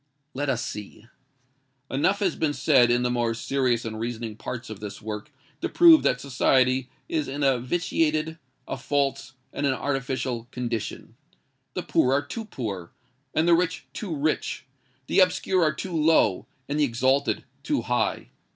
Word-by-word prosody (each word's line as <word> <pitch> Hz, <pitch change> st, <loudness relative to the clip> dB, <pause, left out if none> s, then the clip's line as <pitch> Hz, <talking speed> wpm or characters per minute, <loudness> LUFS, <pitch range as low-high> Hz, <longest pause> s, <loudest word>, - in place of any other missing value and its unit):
Let 140 Hz, +2 st, -2 dB
us 125 Hz, -3 st, 0 dB
see. 105 Hz, +1 st, -8 dB, 0.9 s
Enough 190 Hz, +10 st, +1 dB
has 185 Hz, -5 st, +1 dB
been 155 Hz, -2 st, 0 dB
said 130 Hz, -6 st, +4 dB
in 120 Hz, +1 st, +2 dB
the 125 Hz, -, +1 dB
more 120 Hz, -2 st, 0 dB
serious 125 Hz, -1 st, 0 dB
and 110 Hz, -1 st, -5 dB
reasoning 115 Hz, -1 st, -4 dB
parts 120 Hz, +1 st, -6 dB
of 105 Hz, -, -7 dB
this 105 Hz, -1 st, -7 dB
work 105 Hz, +5 st, -6 dB, 0.3 s
to -, -, -1 dB
prove 335 Hz, -2 st, +8 dB
that 125 Hz, -, +1 dB
society 130 Hz, -1 st, +2 dB, 0.2 s
is 155 Hz, -3 st, -1 dB
in 140 Hz, +2 st, -3 dB
a 135 Hz, -3 st, +3 dB
vitiated—a 155 Hz, 0 st, -2 dB
false—and 135 Hz, -1 st, -2 dB
an 135 Hz, -, +2 dB
artificial 130 Hz, -4 st, -2 dB
condition. 120 Hz, -4 st, -4 dB, 0.6 s
The -, -, -2 dB
poor 130 Hz, -, +2 dB
are 140 Hz, +1 st, +2 dB
too 225 Hz, -1 st, -6 dB
poor, 100 Hz, -, -5 dB, 0.5 s
and 160 Hz, +2 st, +3 dB
the 170 Hz, -, +6 dB
rich 180 Hz, +1 st, +1 dB
too 185 Hz, -7 st, -4 dB
rich: 150 Hz, +2 st, -1 dB, 0.4 s
the -, -, +2 dB
obscure 185 Hz, 0 st, +3 dB
are 155 Hz, -2 st, +4 dB
too 175 Hz, +3 st, -5 dB
low, 155 Hz, -, +3 dB, 0.2 s
and 145 Hz, +2 st, -1 dB
the -, -, +4 dB
exalted 130 Hz, +2 st, +1 dB, 0.2 s
too -, -, -1 dB
high. -, -, -1 dB
135 Hz, 160 wpm, -26 LUFS, 120-155 Hz, 0.9 s, prove